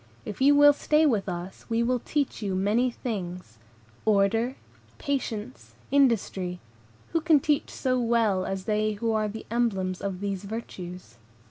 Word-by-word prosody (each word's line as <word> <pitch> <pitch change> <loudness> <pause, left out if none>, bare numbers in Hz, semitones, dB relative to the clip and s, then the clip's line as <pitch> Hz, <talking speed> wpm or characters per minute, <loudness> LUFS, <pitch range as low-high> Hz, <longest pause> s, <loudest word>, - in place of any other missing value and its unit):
If 210 - -7
you 285 +2 +6
will 290 0 +8
stay 305 +2 +2
with 215 -9 +1
us, 175 +1 -7
we 230 0 +1
will 250 +1 +1
teach 285 0 -2
you 195 -3 -2
many 210 +7 +2
things. 180 - -6 0.4
Order, 220 +4 +2 0.4
patience, 255 -4 -4 0.2
industry, 205 -9 +1 0.5
who 330 - +2
can 315 -2 +5
teach 295 +1 0
so 255 -1 -1
well 230 -5 +2
as 195 0 -3
they 215 +1 0
who 225 +2 -1
are 215 -1 +1
the 220 +2 -7
emblems 195 -6 0
of 195 -2 -3
these 200 -1 -3
virtues? 180 - -7
220 Hz, 150 wpm, -27 LUFS, 190-255 Hz, 0.5 s, will